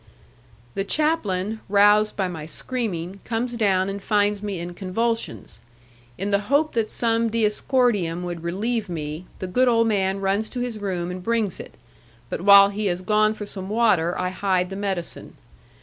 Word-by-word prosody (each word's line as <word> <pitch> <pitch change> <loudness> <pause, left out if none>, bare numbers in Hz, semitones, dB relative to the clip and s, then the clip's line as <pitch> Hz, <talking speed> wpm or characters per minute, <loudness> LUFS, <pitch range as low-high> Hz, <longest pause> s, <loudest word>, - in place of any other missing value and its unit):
The 195 - -1
chaplain, 220 - 0
roused 210 +1 +5
by 190 -2 0
my 160 -4 -6
screaming, 195 -3 -4
comes 240 +2 -2
down 195 -5 +2
and 200 0 -4
finds 205 0 +1
me 200 -3 -4
in 175 +1 -6
convulsions. 225 +6 -3 0.6
In 200 +2 -2
the 200 - +3
hope 300 +2 +2
that 225 -2 0
some 230 -1 +1
diascordium 210 -5 +1
would 175 -2 -5
relieve 205 +5 -2
me, 155 +1 -5
the - - -5
good 250 +8 +2
old 230 -1 +4
man 195 -2 +1
runs 195 +3 0
to 250 - -5
his 245 -3 -3
room 180 -3 -3
and 180 0 -6
brings 220 -2 -1
it, - - -10 0.6
but - - -3
while 200 +1 +8
he 205 +1 -2
has 180 0 -2
gone 215 +2 +3
for 210 - -6
some 195 -2 -6
water 205 -7 +2
I 180 - -1
hide 185 -1 0
the - - -4
medicine. 195 -3 -4
200 Hz, 170 wpm, -23 LUFS, 185-225 Hz, 0.6 s, while